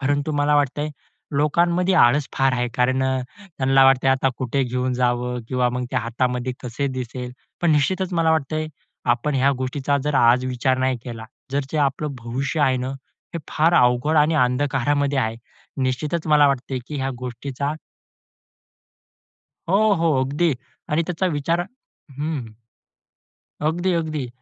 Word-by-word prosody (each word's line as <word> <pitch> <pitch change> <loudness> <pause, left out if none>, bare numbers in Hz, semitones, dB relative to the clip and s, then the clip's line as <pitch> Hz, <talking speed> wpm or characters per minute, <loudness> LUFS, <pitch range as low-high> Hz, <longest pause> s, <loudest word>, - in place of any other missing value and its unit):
परंतु 145 +2 0
मला 145 +1 +3
वाटतंय 145 +1 0 0.5
लोकांमध्ये 170 +5 +2
आळस 140 -1 +4
फार 135 -1 +3
आहे 125 -1 0
कारण 130 +1 +2
अ, 130 -1 +1 0.4
त्यांना 135 0 +4
वाटतंय, 135 0 +4
आता 135 0 +2
कुठे 135 +1 0
घेऊन 125 +1 -1
जावं 125 0 0
किंवा 125 -1 +1
मग 125 0 -3
ते - - 0
हातामध्ये 125 +2 -1
कसे 125 +3 -3
दिसेल. 125 0 -5 0.3
पण 170 -2 +3
निश्चितच 185 +5 +1
मला 165 -2 +2
वाटतंय 155 0 0 0.5
आपण 140 +5 -2
ह्या 135 +1 +3
गोष्टीचा 130 +2 -1
जर 150 0 0
आज 125 0 +4
विचार 130 +1 0
नाही 130 0 +1
केला, 115 -2 -7 0.3
जर 140 - +2
जे 155 - -1
आपलं 140 +1 0
भविष्य 130 +6 -3
आहे 130 -3 +3
ना, 125 +1 -3 0.5
हे - - -1
फार 165 +3 +3
अवघड 125 +3 +3
आणि 150 +2 +4
अंधकारामध्ये 140 +2 +1
आहे. 110 -3 -1 0.5
निश्चितच 150 +6 -1
मला 150 -1 +5
वाटतंय 135 -1 -2
की 150 - -5
ह्या 135 -1 -1
गोष्टीचा 130 +3 -4 2.0
हो, 190 - +4 0.2
हो, 165 -2 +1
अगदी. 150 +5 +1 0.4
आणि 155 +3 +1
त्याचा 180 +1 -1
विचार 160 +4 0
हं, 175 - -3 0.5
हं. 150 -5 -2 1.2
अगदी, 175 +3 0
अगदी. 155 -5 -2
135 Hz, 150 wpm, -22 LUFS, 125-150 Hz, 2.0 s, मला